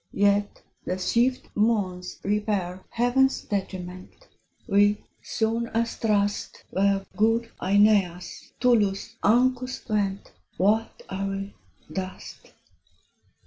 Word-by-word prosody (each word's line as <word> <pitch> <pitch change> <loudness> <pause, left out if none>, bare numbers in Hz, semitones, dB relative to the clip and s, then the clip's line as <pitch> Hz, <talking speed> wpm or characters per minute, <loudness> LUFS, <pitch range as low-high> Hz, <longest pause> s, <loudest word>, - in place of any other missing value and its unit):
Yet 205 0 +1 0.2
the 185 - -2
swift 240 +7 +1
moons 200 -5 0
repair 200 -3 -1
Heaven's 255 +3 +2
detriment: 185 - -6 0.4
We, 205 0 +3 0.2
soon 230 +1 -1
as 230 0 0
thrust 205 -2 0
Where 195 0 +2
good 225 +2 +2
Aeneas, 195 -3 +2
Tullus, 215 -6 +2
Ancus 255 +3 +2
went, 200 -3 -1 0.3
What 215 +4 +1
are 195 +1 -3
we? 195 0 -4 0.4
dust. 185 -1 -7
205 Hz, 95 wpm, -26 LUFS, 195-230 Hz, 0.4 s, We